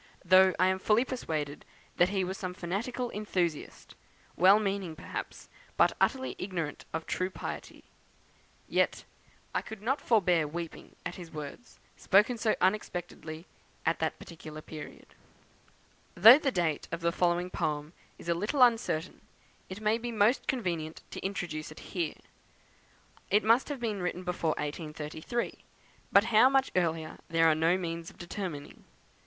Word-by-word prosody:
Though 185 +1 +6
I 185 - +4
am 190 0 +2
fully 215 +5 +3
persuaded 155 - -4 0.3
that 175 - +5
he 195 -1 0
was 185 +1 -3
some 185 -2 -5
fanatical 235 +8 -3
enthusiast, 180 -7 -3 0.4
well 190 +5 +7
meaning 195 -5 -2
perhaps, - - -7 0.3
but - - +4
utterly 260 -1 +1
ignorant 175 -6 -4
of 160 0 -3
true 185 0 -1
piety; - - -7 0.8
yet - - +1 0.5
I - - +1
could 220 - -9
not 265 +5 0
forbear 180 -8 +3
weeping 165 +2 -7
at 180 - -4
his 175 -3 -9
words, 150 +10 -8 0.2
spoken 210 +5 +3
so 220 -1 +2
unexpectedly 175 -4 -2 0.4
at - - +1
that - - -1
particular 155 -2 -10
period." 155 -1 -10 1.0
Though 225 +10 +10
the 275 -3 0
date 170 - -1
of 170 +1 -3
the 170 0 +2
following 175 +1 +1
poem 150 -1 -2 0.2
is - - -12
a 170 - +3
little 215 - +2
uncertain, 225 -8 +1 0.5
it 185 +3 -7
may 215 +2 +2
be 240 +1 -4
most 220 +3 +2
convenient 170 -10 -2
to - - -7
introduce 175 -6 -4
it 155 - -11
here. 170 -5 -1 1.1
It 210 +2 +4
must 230 +7 +4
have 285 -3 -4
been 215 -5 -2
written 180 +1 -3
before 170 -3 -1
1833, 155 +8 -4 0.5
but 200 - +7
how 235 +5 +7
much 270 0 +2
earlier 165 -3 -1
there 165 0 +3
are 160 - +6
no 165 +3 +3
means 170 -1 -4
of - - -18
determining. 175 -5 -6
180 Hz, 150 wpm, -30 LUFS, 165-215 Hz, 1.1 s, Though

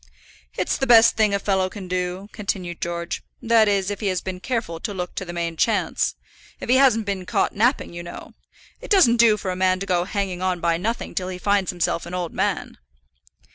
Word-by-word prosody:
"It's - - 0
the 270 - -1
best 230 -1 +7
thing 215 -2 +3
a 200 - +2
fellow 190 -2 0
can 195 -1 -8
do," 180 +2 -3
continued 185 -4 -4
George; 170 0 -3 0.2
"that 225 -1 +4
is, 200 -1 +1
if 205 - -5
he 210 - -2
has 185 -2 0
been 185 0 -6
careful 220 -7 -3
to 205 +4 -5
look 180 -1 -4
to 190 - -5
the 175 - -6
main 170 -1 -3
chance, 220 +6 +1 0.4
if - - -7
he 255 - +5
hasn't 245 -5 +4
been 190 -3 -3
caught - - +1
napping, 235 -1 +1
you 175 - -6
know. 175 - -10 0.5
It - - -9
doesn't 350 - +5
do 230 -2 +5
for 190 -3 -3
a - - -3
man 185 0 +2
to 195 - -4
go 180 -2 +1
hanging 190 -2 -3
on 185 -1 0
by 170 0 +1
nothing 225 +7 -3
till 185 - -2
he 185 -1 -5
finds 200 0 +1
himself 170 -1 -1
an 180 - -5
old 175 -2 -3
man." - - -2
190 Hz, 220 wpm, -23 LUFS, 180-215 Hz, 0.5 s, best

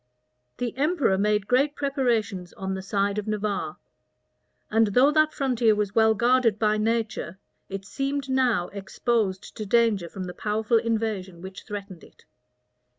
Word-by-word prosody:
The 245 -2 -3
emperor 290 - +2
made 210 +1 +1
great 275 +4 +2
preparations 230 -10 -1
on 190 0 -4
the 190 - -4
side 200 +1 0
of 210 - -6
Navarre; 210 -1 -2 0.9
and 225 0 +4
though 250 +8 +4
that 310 0 +3
frontier 245 -6 +2
was 205 -1 -1
well 220 0 +4
guarded 240 -1 +3
by 215 -1 +1
nature, 215 -5 -1 0.3
it 195 0 -6
seemed 275 +4 -3
now 250 -9 +1
exposed 200 0 -2
to 215 - -3
danger 215 -6 +2
from 190 +1 -6
the 180 -1 -6
powerful 215 +3 0
invasion 215 -6 -2
which 190 +1 -9
threatened 200 -4 -7
it. - - -19
215 Hz, 150 wpm, -25 LUFS, 195-245 Hz, 0.9 s, and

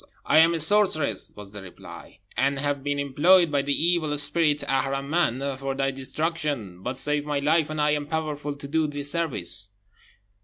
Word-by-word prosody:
"I 155 - +5
am 165 +1 +5
a - - -2
sorceress," 160 - +2
was 105 -1 -10
the 100 - -7
reply, 95 -2 -12 0.2
"and 135 +2 +1
have 140 0 -2
been 145 0 -1
employed 155 +5 +4
by 140 -1 +2
the 140 0 0
evil 165 -4 +1
spirit 150 +1 +1
Aharman 135 0 0
for 135 0 -3
thy 135 0 0
destruction; 135 - -3
but 125 +5 -4
save 150 +1 -1
my 145 -1 -1
life, 155 +2 +2
and 155 0 -4
I 150 0 +3
am 145 -1 -1
powerful 150 -2 -3
to 140 0 -9
do 160 +2 +1
thee 145 -1 -5
service." 100 - 0
145 Hz, 180 wpm, -25 LUFS, 135-155 Hz, 0.2 s, I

